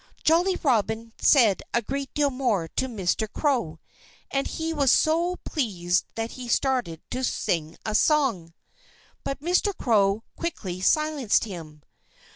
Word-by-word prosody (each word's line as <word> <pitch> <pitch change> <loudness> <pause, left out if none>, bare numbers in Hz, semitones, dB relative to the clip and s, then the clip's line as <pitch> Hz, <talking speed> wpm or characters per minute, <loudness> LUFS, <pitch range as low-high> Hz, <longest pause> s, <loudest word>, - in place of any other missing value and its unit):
Jolly 350 +4 +3
Robin 225 -3 0
said 230 -9 +5
a 235 - +2
great 275 +3 -4
deal 290 -1 +2
more 240 -10 0
to 260 - -2
Mr. 215 -1 -1
Crow. 245 - 0 0.5
And 275 0 0
he 325 0 -3
was 280 -5 +3
so 340 +3 +2
pleased 185 - 0
that 225 0 -3
he 255 -1 -8
started 240 - 0
to 255 - -3
sing 165 -9 -1
a 215 - -2
song. 220 - +2 0.7
But 275 0 -4
Mr. 360 +4 +1
Crow 210 -2 +2
quickly 190 - -4
silenced 300 0 +2
him. 160 -7 -9
240 Hz, 135 wpm, -25 LUFS, 195-290 Hz, 0.7 s, said